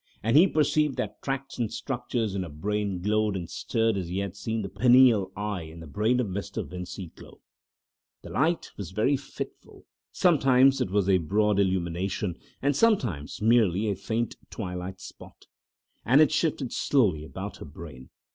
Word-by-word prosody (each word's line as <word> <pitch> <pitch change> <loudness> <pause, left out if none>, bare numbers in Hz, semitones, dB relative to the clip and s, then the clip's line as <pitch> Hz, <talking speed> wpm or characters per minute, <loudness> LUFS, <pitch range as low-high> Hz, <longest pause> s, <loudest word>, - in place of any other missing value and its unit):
And 115 +4 +1
he 170 +6 +8
perceived 150 -3 +1
that 105 0 -4
tracts 135 -1 -4
and 115 -3 -1
structures 120 -5 -3
in 100 - -2
her 90 - -5
brain 100 +4 -3
glowed 105 0 +1
and 90 -3 -4
stirred 115 +4 0
as 90 -3 -3
he 90 +2 -4
had 100 -1 -3
seen 110 +2 -3
the - - -3
pineal 120 -3 +5
eye 105 -2 -3
in 80 +1 -10
the 80 - -9
brain 110 - +1
of 125 - +1
Mr. 100 0 -4
Vincey 90 -1 -7
glow. - - -14 0.8
The - - -9
light 165 +4 0
was 100 -4 -6
very 110 +9 +1
fitful; 140 - -8 0.3
sometimes 135 -7 +4
it - - 0
was 100 0 +1
a 95 -2 +4
broad 105 +4 +1
illumination, 95 0 -1 0.2
and 140 0 +2
sometimes 120 - +1
merely 110 -3 +3
a - - -1
faint 115 +4 -3
twilight 90 -2 -6
spot, - - -13 0.6
and 135 +5 +5
it 155 - +5
shifted 150 -5 0
slowly 100 - +2
about 75 -4 -7
her - - -9
brain. 70 -4 -11
105 Hz, 170 wpm, -27 LUFS, 90-125 Hz, 0.8 s, he